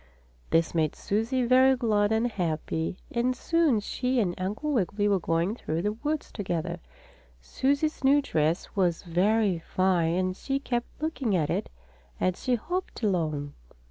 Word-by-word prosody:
This 165 Hz, 0 st, +2 dB
made 160 Hz, -3 st, +1 dB
Susie 230 Hz, +5 st, 0 dB
very 260 Hz, +2 st, +5 dB
glad 215 Hz, -4 st, +1 dB
and 220 Hz, +1 st, +2 dB
happy, 165 Hz, -5 st, -2 dB
and 245 Hz, +2 st, +1 dB
soon 320 Hz, -4 st, +2 dB
she 250 Hz, +4 st, -1 dB
and 185 Hz, -6 st, +1 dB
Uncle 215 Hz, +11 st, -2 dB
Wiggily 205 Hz, -2 st, +1 dB
were 200 Hz, -2 st, +3 dB
going 165 Hz, +3 st, 0 dB
through 165 Hz, -7 st, -3 dB
the 210 Hz, -, +1 dB
woods 295 Hz, +7 st, -3 dB
together. 175 Hz, -4 st, -3 dB, 0.6 s
Susie's 280 Hz, -, -1 dB
new 275 Hz, +2 st, +5 dB
dress 160 Hz, -, -1 dB
was 180 Hz, -4 st, +1 dB
very 190 Hz, +2 st, +2 dB
fine 175 Hz, -1 st, +1 dB
and 185 Hz, 0 st, 0 dB
she 270 Hz, +7 st, -2 dB
kept 245 Hz, -3 st, -2 dB, 0.2 s
looking 270 Hz, -10 st, 0 dB
at 155 Hz, -4 st, +1 dB
it -, -, -2 dB, 0.5 s
as 185 Hz, -1 st, 0 dB
she 250 Hz, -, +1 dB
hopped 350 Hz, +3 st, -4 dB
along. 155 Hz, -8 st, 0 dB
205 Hz, 150 wpm, -27 LUFS, 175-255 Hz, 0.6 s, very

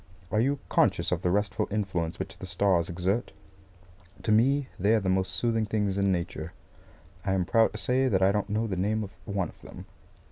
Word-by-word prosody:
Are 105 Hz, -, +2 dB
you 140 Hz, +4 st, +1 dB
conscious 90 Hz, -4 st, +2 dB
of 90 Hz, -1 st, 0 dB
the 90 Hz, -, +1 dB
restful 100 Hz, 0 st, 0 dB
influence 95 Hz, -6 st, -2 dB
which -, -, -6 dB
the 95 Hz, -, -7 dB
stars 90 Hz, -2 st, +1 dB
exert? 95 Hz, +6 st, -1 dB, 0.9 s
To 110 Hz, -, 0 dB
me 130 Hz, +5 st, +3 dB
they 105 Hz, +4 st, +4 dB
are -, -, +3 dB
the 95 Hz, -2 st, -2 dB
most 95 Hz, 0 st, +1 dB
soothing 115 Hz, -2 st, 0 dB
things 105 Hz, -3 st, 0 dB
in 100 Hz, -1 st, +2 dB
Nature. 85 Hz, -2 st, -3 dB, 0.7 s
I 95 Hz, -1 st, 0 dB
am 95 Hz, -2 st, +1 dB
proud 115 Hz, +4 st, +3 dB
to -, -, -5 dB
say 125 Hz, +6 st, +1 dB
that 95 Hz, -6 st, +2 dB
I 95 Hz, -, +5 dB
don't 105 Hz, 0 st, -1 dB
know 110 Hz, +2 st, 0 dB
the 100 Hz, -4 st, -2 dB
name 105 Hz, +4 st, 0 dB
of 100 Hz, -, -7 dB
one 100 Hz, -4 st, -1 dB
of -, -, -18 dB
them. -, -, -11 dB
100 Hz, 210 wpm, -28 LUFS, 95-110 Hz, 0.9 s, I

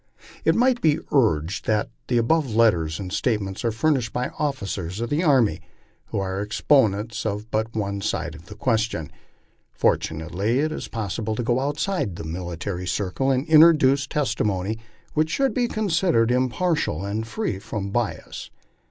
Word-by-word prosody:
It -, -, +3 dB
might 245 Hz, 0 st, +3 dB
be 155 Hz, -1 st, +3 dB
urged 90 Hz, -, +1 dB
that 110 Hz, -1 st, +1 dB, 0.2 s
the 120 Hz, -, +1 dB
above 125 Hz, 0 st, +1 dB
letters 85 Hz, -9 st, +3 dB
and 95 Hz, -2 st, -5 dB
statements 105 Hz, -6 st, -1 dB
are 115 Hz, -, +1 dB
furnished 120 Hz, -1 st, +1 dB
by 125 Hz, +1 st, -2 dB
officers 100 Hz, -, -3 dB
of 120 Hz, 0 st, -3 dB
the 150 Hz, +3 st, +2 dB
army, 120 Hz, -, +3 dB, 0.5 s
who -, -, -4 dB
are 95 Hz, 0 st, -2 dB
exponents 105 Hz, 0 st, +1 dB
of 105 Hz, +1 st, -3 dB
but 110 Hz, +1 st, -1 dB
one 100 Hz, -2 st, -2 dB
side 80 Hz, -5 st, -2 dB
of 80 Hz, +2 st, -13 dB
the -, -, -10 dB
question. 110 Hz, -, -1 dB, 0.7 s
Fortu -, -, +2 dB
nately 95 Hz, +9 st, -1 dB
it 155 Hz, +3 st, +1 dB
is 155 Hz, -, -5 dB
possible 110 Hz, 0 st, -3 dB
to 120 Hz, -, -2 dB
go 120 Hz, +2 st, +1 dB
outside 145 Hz, -, -1 dB
the -, -, -7 dB
military 90 Hz, +2 st, -4 dB
circle 100 Hz, +9 st, -1 dB
and 130 Hz, +1 st, +1 dB
introduce 150 Hz, -4 st, +6 dB
testimony 110 Hz, -7 st, -1 dB, 0.3 s
which 155 Hz, +1 st, +1 dB
should 270 Hz, -, +1 dB
be 245 Hz, -2 st, +1 dB
considered 175 Hz, -, +1 dB
impartial 130 Hz, -, 0 dB
and 110 Hz, +3 st, -3 dB
fi 210 Hz, -, -2 dB
ee -, -, -10 dB
from 100 Hz, 0 st, -5 dB
bias. 120 Hz, 0 st, -3 dB
115 Hz, 160 wpm, -24 LUFS, 100-140 Hz, 0.7 s, introduce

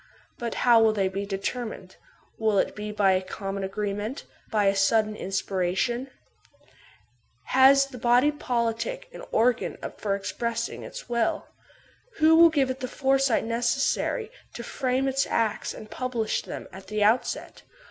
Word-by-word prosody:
But 235 Hz, -1 st, -3 dB
how 235 Hz, -2 st, +7 dB
will 220 Hz, -1 st, +4 dB
they 195 Hz, -3 st, +1 dB
be 195 Hz, +1 st, -4 dB
determined? 200 Hz, -1 st, -5 dB, 0.4 s
Will 220 Hz, -2 st, +2 dB
it -, -, +1 dB
be 210 Hz, 0 st, -5 dB
by 205 Hz, -2 st, +3 dB
a 185 Hz, 0 st, +2 dB
common 195 Hz, +1 st, -5 dB
agreement, 205 Hz, +4 st, -3 dB, 0.3 s
by 210 Hz, -2 st, +1 dB
a 195 Hz, 0 st, +3 dB
sudden 215 Hz, +2 st, +2 dB
inspiration? 195 Hz, +6 st, -1 dB, 1.3 s
Has 270 Hz, +1 st, +5 dB
the 265 Hz, -3 st, -11 dB
body 245 Hz, +5 st, +4 dB
politic 260 Hz, -, -2 dB
an -, -, -9 dB
organ 235 Hz, +2 st, +1 dB, 0.2 s
for 200 Hz, -2 st, -1 dB
expressing 235 Hz, +3 st, -3 dB
its -, -, -9 dB
will? 235 Hz, -2 st, -1 dB, 0.6 s
Who 320 Hz, -3 st, +5 dB
will 335 Hz, +1 st, +8 dB
give 275 Hz, -5 st, +1 dB
it 260 Hz, -, -6 dB
the 255 Hz, -, -3 dB
foresight 270 Hz, -2 st, +1 dB
necessary 245 Hz, -, 0 dB, 0.2 s
to 235 Hz, -, -6 dB
frame 260 Hz, +2 st, -1 dB
its 270 Hz, +1 st, +1 dB
acts 220 Hz, -2 st, 0 dB
and 215 Hz, -, -9 dB
publish 245 Hz, -4 st, -2 dB
them -, -, -8 dB
at 190 Hz, +1 st, -11 dB
the 215 Hz, -1 st, 0 dB
out 220 Hz, +4 st, +3 dB
set -, -, -6 dB
230 Hz, 150 wpm, -26 LUFS, 205-260 Hz, 1.3 s, will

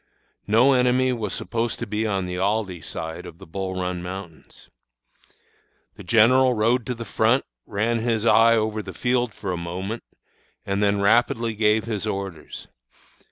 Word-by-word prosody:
No 120 Hz, +6 st, +5 dB
enemy 125 Hz, 0 st, +3 dB
was 110 Hz, -5 st, -3 dB
supposed 115 Hz, +5 st, -2 dB
to 115 Hz, -, -4 dB
be 110 Hz, 0 st, -2 dB
on 95 Hz, -3 st, -1 dB
the 90 Hz, 0 st, -4 dB
Aldie 100 Hz, -3 st, -1 dB
side 80 Hz, +3 st, -6 dB
of 85 Hz, -, -11 dB
the 95 Hz, -, -12 dB
Bull 95 Hz, +2 st, -4 dB
Run 90 Hz, -1 st, -3 dB
Mountains. 90 Hz, -2 st, -9 dB, 1.3 s
"The -, -, -11 dB
general 125 Hz, +3 st, +4 dB
rode 115 Hz, +2 st, +1 dB
to 125 Hz, -, -2 dB
the 115 Hz, 0 st, -7 dB
front, 115 Hz, +5 st, +2 dB, 0.2 s
ran 115 Hz, +3 st, 0 dB
his 115 Hz, -1 st, 0 dB
eye 115 Hz, 0 st, +6 dB
over 110 Hz, -1 st, -1 dB
the -, -, -9 dB
field 125 Hz, -1 st, 0 dB
for 100 Hz, -2 st, -5 dB
a 90 Hz, -, -2 dB
moment, 95 Hz, +6 st, -5 dB, 0.6 s
and 100 Hz, +1 st, -1 dB
then 100 Hz, -1 st, +2 dB
rapidly 115 Hz, +2 st, +2 dB
gave 105 Hz, 0 st, +2 dB
his 110 Hz, -2 st, -3 dB
orders. 95 Hz, -6 st, -6 dB
110 Hz, 160 wpm, -23 LUFS, 95-115 Hz, 1.3 s, eye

